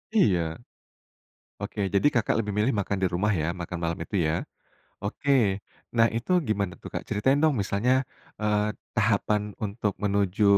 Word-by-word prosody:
Iya. 100 Hz, -, +5 dB, 1.2 s
Oke, -, -, -4 dB
jadi 100 Hz, -, +4 dB
Kakak 115 Hz, -1 st, +2 dB
lebih 105 Hz, -2 st, -1 dB
milih 110 Hz, +5 st, +3 dB
makan 100 Hz, +1 st, -1 dB
di -, -, +5 dB
rumah 105 Hz, +4 st, +2 dB
ya, 80 Hz, -, 0 dB
makan 85 Hz, +1 st, -4 dB
malam 85 Hz, 0 st, -1 dB
itu, -, -, -12 dB
ya? 80 Hz, -, +1 dB, 0.7 s
Oke, 140 Hz, -, -1 dB, 0.6 s
nah, 115 Hz, 0 st, +6 dB
itu 115 Hz, +10 st, -2 dB, 0.2 s
gimana 100 Hz, -4 st, 0 dB
tuh, -, -, -8 dB
Kak? -, -, -3 dB
Ceritain 130 Hz, +7 st, +2 dB
dong 155 Hz, -2 st, +5 dB
misalnya, 100 Hz, +6 st, +1 dB, 0.5 s
eee, 105 Hz, 0 st, +1 dB, 0.2 s
tahapan 105 Hz, -1 st, +1 dB
untuk 105 Hz, 0 st, -1 dB
menuju 100 Hz, 0 st, +1 dB
105 Hz, 155 wpm, -27 LUFS, 100-110 Hz, 1.2 s, nah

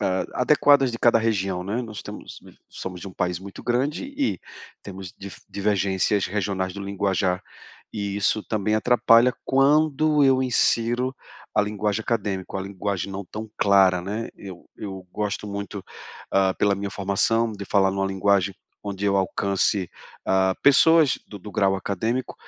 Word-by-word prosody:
a 95 Hz, +4 st, -2 dB
adequadas 140 Hz, -1 st, +4 dB
de 115 Hz, -, -6 dB
cada 115 Hz, -1 st, +4 dB
região, 100 Hz, -5 st, -1 dB
né. 105 Hz, +6 st, -2 dB
Nós 110 Hz, -4 st, -7 dB
temos -, -, -9 dB, 0.3 s
somos 90 Hz, -1 st, -7 dB
de -, -, -7 dB
um 95 Hz, -, -12 dB
país 90 Hz, -1 st, -1 dB
muito 95 Hz, +1 st, -10 dB
grande, 135 Hz, -, -1 dB
e 280 Hz, -1 st, -2 dB, 0.4 s
temos 95 Hz, -2 st, -8 dB
dif 100 Hz, 0 st, -10 dB
divergências 100 Hz, 0 st, 0 dB
regionais 95 Hz, -1 st, -2 dB
do 100 Hz, -, -8 dB
linguajar, 95 Hz, -2 st, -1 dB, 0.5 s
e 100 Hz, -2 st, -3 dB
isso 105 Hz, +1 st, +1 dB
também 105 Hz, 0 st, -1 dB
atrapalha 120 Hz, +1 st, +4 dB
quando 150 Hz, +2 st, +3 dB
eu 130 Hz, -1 st, +4 dB
insiro 125 Hz, 0 st, +1 dB, 0.4 s
a -, -, +4 dB
linguagem 105 Hz, +1 st, -2 dB
acadêmica, 100 Hz, -5 st, -2 dB
uma 95 Hz, -, -3 dB
linguagem 100 Hz, 0 st, -3 dB
não 100 Hz, +1 st, -5 dB
tão 110 Hz, +4 st, -8 dB
clara, 95 Hz, -3 st, +4 dB
né. 105 Hz, +5 st, -4 dB
Eu 95 Hz, -3 st, -11 dB
eu 95 Hz, -3 st, -7 dB
gosto 105 Hz, 0 st, -3 dB
muito, 100 Hz, -1 st, -6 dB, 0.5 s
ah, 95 Hz, -1 st, +3 dB
pela 100 Hz, -1 st, +2 dB
minha 100 Hz, 0 st, -4 dB
formação, 110 Hz, +4 st, +1 dB
de 100 Hz, -1 st, -7 dB
falar 95 Hz, -1 st, +2 dB
numa 95 Hz, 0 st, -1 dB
linguagem 95 Hz, 0 st, +1 dB, 0.3 s
onde 100 Hz, -1 st, -5 dB
eu 100 Hz, -1 st, +2 dB
alcance, 95 Hz, 0 st, 0 dB, 0.4 s
ah, 95 Hz, 0 st, +2 dB
pessoas 155 Hz, +1 st, +5 dB
do 105 Hz, -, -9 dB
do 105 Hz, +2 st, -10 dB
grau 95 Hz, 0 st, +2 dB
acadêmico, 110 Hz, +7 st, -2 dB
100 Hz, 155 wpm, -24 LUFS, 95-115 Hz, 0.5 s, pessoas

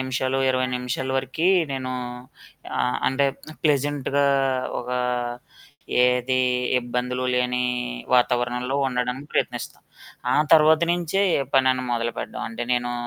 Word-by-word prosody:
నిమిషాలు, 130 Hz, 0 st, -1 dB
ఇరవై 130 Hz, 0 st, +1 dB
నిమిషాల 125 Hz, +1 st, -3 dB
వరకీ 135 Hz, +6 st, -1 dB, 0.2 s
నేను 130 Hz, -1 st, -3 dB, 1.2 s
అంటే 135 Hz, +1 st, +2 dB, 0.4 s
ప్లెజెంట్‌గా 145 Hz, -1 st, +1 dB, 0.6 s
ఒక 125 Hz, 0 st, -6 dB, 1.1 s
ఏది 125 Hz, +1 st, +2 dB, 0.4 s
ఇబ్బందులు 125 Hz, +1 st, -2 dB
లేని 125 Hz, 0 st, +1 dB, 0.5 s
వాతావరణంలో 125 Hz, +1 st, +1 dB
ఉండడానికి 125 Hz, +3 st, -3 dB
ప్రయత్నిస్తాను. -, -, -2 dB, 0.5 s
ఆ -, -, +3 dB, 0.2 s
తర్వాత 155 Hz, 0 st, +6 dB
నుంచే 175 Hz, +2 st, 0 dB, 0.2 s
ఏ -, -, 0 dB
పనైనా 130 Hz, -1 st, +3 dB
మొదలుపెట్టడం 115 Hz, 0 st, -3 dB
అంటే 115 Hz, +1 st, -5 dB
నేను 120 Hz, 0 st, 0 dB
130 Hz, 100 wpm, -24 LUFS, 125-135 Hz, 1.2 s, తర్వాత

